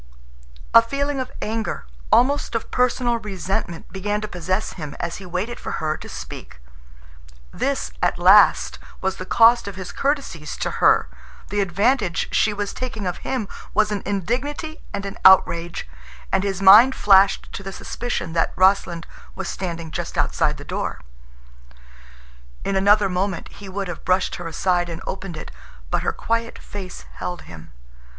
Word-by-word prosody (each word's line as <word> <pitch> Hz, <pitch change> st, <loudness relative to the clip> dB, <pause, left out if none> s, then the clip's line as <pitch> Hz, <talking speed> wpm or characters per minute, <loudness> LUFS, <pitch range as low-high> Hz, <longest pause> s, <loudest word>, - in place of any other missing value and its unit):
A -, -, +10 dB
feeling 280 Hz, +4 st, -2 dB
of 255 Hz, -1 st, -4 dB
anger, 220 Hz, 0 st, -3 dB, 0.3 s
almost 275 Hz, -1 st, +3 dB
of 230 Hz, -, -3 dB
personal 245 Hz, -1 st, +1 dB
resentment, 190 Hz, -4 st, -4 dB
began 205 Hz, +2 st, -1 dB
to 215 Hz, -, -3 dB
possess 185 Hz, +3 st, -2 dB
him 150 Hz, -5 st, -7 dB
as 170 Hz, -1 st, -3 dB
he 185 Hz, -, -10 dB
waited 195 Hz, +7 st, -3 dB
for -, -, -5 dB
her 155 Hz, 0 st, -1 dB
to -, -, -10 dB
speak. -, -, -9 dB, 0.9 s
This, -, -, -2 dB
at -, -, +1 dB
last, -, -, +5 dB, 0.2 s
was 190 Hz, 0 st, -2 dB
the 185 Hz, -, -7 dB
cost 235 Hz, -1 st, +5 dB
of 200 Hz, -, -5 dB
his 185 Hz, -1 st, -6 dB
courtesies 275 Hz, -, -2 dB
to -, -, -2 dB
her, -, -, +5 dB, 0.4 s
The 205 Hz, +1 st, 0 dB
advantage 200 Hz, +1 st, +1 dB
she 215 Hz, -, +3 dB
was 205 Hz, -1 st, -3 dB
taking 230 Hz, -5 st, -5 dB
of 180 Hz, -, -2 dB
him 250 Hz, -6 st, -3 dB, 0.3 s
was 215 Hz, 0 st, +3 dB
an 205 Hz, -2 st, -2 dB
indignity 255 Hz, -, -3 dB
and 200 Hz, 0 st, -4 dB
an 195 Hz, -, -6 dB
outrage, 175 Hz, -, +4 dB, 0.4 s
and 190 Hz, 0 st, +2 dB
his 195 Hz, -1 st, -2 dB
mind 220 Hz, +7 st, +9 dB
flashed 195 Hz, -1 st, +4 dB
to -, -, -5 dB
the 195 Hz, 0 st, -6 dB
suspicion 210 Hz, -5 st, -4 dB
that 165 Hz, -, +1 dB
Rossland 185 Hz, -3 st, +2 dB, 0.3 s
was 190 Hz, -2 st, -4 dB
standing 170 Hz, -3 st, -5 dB
just -, -, -4 dB
outside -, -, +1 dB
the -, -, -10 dB
door. -, -, -4 dB, 1.6 s
In 195 Hz, -, 0 dB
another 205 Hz, +1 st, +4 dB
moment 185 Hz, 0 st, -2 dB
he 200 Hz, -1 st, -11 dB
would 195 Hz, +1 st, -3 dB
have 175 Hz, -, -7 dB
brushed 185 Hz, +1 st, +1 dB
her 175 Hz, -, -6 dB
aside 175 Hz, +1 st, 0 dB
and 165 Hz, -1 st, -5 dB
opened 190 Hz, -3 st, -5 dB
it, -, -, -8 dB, 0.4 s
but -, -, +1 dB
her -, -, 0 dB
quiet 230 Hz, 0 st, -2 dB
face 190 Hz, -3 st, -8 dB
held 180 Hz, 0 st, -4 dB
him. 80 Hz, -1 st, -12 dB
195 Hz, 160 wpm, -22 LUFS, 180-225 Hz, 1.6 s, A